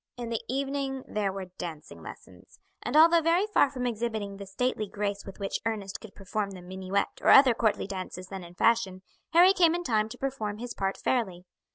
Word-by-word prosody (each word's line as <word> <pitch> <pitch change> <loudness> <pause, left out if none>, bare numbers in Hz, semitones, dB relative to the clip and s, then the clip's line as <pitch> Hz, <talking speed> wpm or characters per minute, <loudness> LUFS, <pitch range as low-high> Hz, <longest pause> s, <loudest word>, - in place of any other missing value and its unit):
In 240 -1 -5
the 230 -1 -2
evening 270 0 -2
there 205 -2 -1
were 190 -2 -7
dancing 160 -4 -7
lessons, - - -13 0.2
and - - 0
although 335 +1 +7
very 335 +5 +3
far 415 -9 +3
from 255 -2 -4
exhibiting 220 -4 -3
the 200 0 -8
stately 215 +2 -1
grace 200 0 -3
with 195 - -9
which 195 -1 -2
Ernest 210 -3 -3
could 220 - -12
perform 200 +1 -3
the 185 -2 -10
minuet 190 +2 -3
or - - +3
other 270 -2 +8
courtly 220 -2 0
dances 185 -1 -6
then 190 -2 -6
in 175 0 -12
fashion, 195 -4 +1 0.3
Harry 360 +3 +7
came 340 -3 +4
in 350 - -3
time 215 -7 +1
to - - -9
perform 225 -7 -3
his 240 +1 -6
part 195 0 -2
fairly. 190 -8 -1
215 Hz, 200 wpm, -28 LUFS, 195-265 Hz, 0.3 s, other